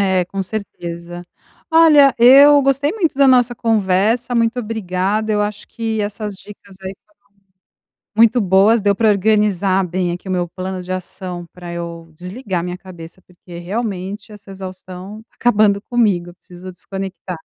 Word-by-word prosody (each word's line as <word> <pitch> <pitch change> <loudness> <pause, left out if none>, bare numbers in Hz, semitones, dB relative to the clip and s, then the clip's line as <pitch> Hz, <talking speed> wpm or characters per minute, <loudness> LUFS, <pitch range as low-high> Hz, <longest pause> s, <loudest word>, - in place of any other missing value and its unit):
é, 190 -2 +2
com 195 +2 -4
certeza. 175 -4 -7 0.5
Olha, 305 -4 +6
eu 280 +4 +8
gostei 275 +2 +1
muito 365 -9 -1
da 275 -1 +5
nossa 245 -1 +4
conversa, 225 +2 +1
muito 230 +1 +1
obrigada. 215 -1 -2
Eu 210 0 +1
acho 210 0 -5
que 225 -1 -3
essas 205 0 -4
dicas 200 0 -14
aí 190 +1 -6
foram 210 - -34 1.0
muito 230 +2 +5
boas, 200 +4 +4
deu 200 -1 +2
para 220 0 +2
organizar 200 -2 +2
bem 180 0 -2
aqui 175 +2 -9
o 190 - -3
meu 175 -1 -1
plano 185 0 -5
de 180 +1 -8
ação, 180 -1 -6
pra 175 -1 -9
eu 170 -1 -7
desligar 185 0 -4
a - - -6
minha 180 0 -5
cabeça, 180 -1 -12
porque 175 -1 -13
realmente 200 +1 -5
essa 205 -1 -14
exaustão 190 +2 -9
tá - - -34
acabando 215 -4 +2
comigo, 205 -8 +1
eu 175 - -15
preciso 180 0 -12
desconectar. 190 -1 -7
195 Hz, 160 wpm, -18 LUFS, 180-225 Hz, 1.0 s, eu